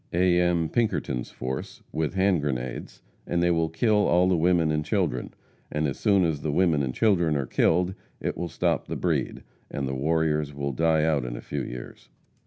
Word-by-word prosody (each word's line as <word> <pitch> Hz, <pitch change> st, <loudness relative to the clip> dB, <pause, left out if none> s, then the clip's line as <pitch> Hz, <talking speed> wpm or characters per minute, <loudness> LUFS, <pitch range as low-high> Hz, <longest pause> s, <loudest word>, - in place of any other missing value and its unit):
A. 90 Hz, 0 st, +3 dB
M. 85 Hz, -2 st, +2 dB
Pinkerton's 80 Hz, -, -1 dB
force, 65 Hz, +1 st, -6 dB
with 80 Hz, +3 st, -2 dB
hand 95 Hz, -3 st, +2 dB
grenades, 65 Hz, -3 st, -4 dB, 0.2 s
and 85 Hz, 0 st, 0 dB
they 85 Hz, -, +3 dB
will 80 Hz, -1 st, +1 dB
kill 105 Hz, +5 st, +2 dB
all 90 Hz, +1 st, +4 dB
the 95 Hz, -, +3 dB
women 85 Hz, -1 st, +2 dB
and 75 Hz, 0 st, 0 dB
children, -, -, -1 dB, 0.4 s
and 75 Hz, 0 st, 0 dB
as 70 Hz, -, -4 dB
soon 100 Hz, -4 st, +3 dB
as 75 Hz, -4 st, -1 dB
the 75 Hz, -, -1 dB
women 80 Hz, -2 st, +2 dB
and 65 Hz, -2 st, -1 dB
children 85 Hz, -, +2 dB
are 70 Hz, -, -1 dB
killed 90 Hz, +8 st, +2 dB, 0.3 s
it -, -, -2 dB
will 85 Hz, -, -4 dB
stop -, -, -1 dB
the -, -, -4 dB
breed, -, -, -1 dB, 0.3 s
and 70 Hz, -1 st, -3 dB
the 65 Hz, -, -3 dB
warriors 75 Hz, +1 st, 0 dB
will 70 Hz, 0 st, -2 dB
die 80 Hz, +2 st, +2 dB
out 75 Hz, -4 st, +1 dB
in -, -, -5 dB
a -, -, -6 dB
few -, -, -4 dB
years. -, -, -8 dB
80 Hz, 195 wpm, -26 LUFS, 70-90 Hz, 0.4 s, all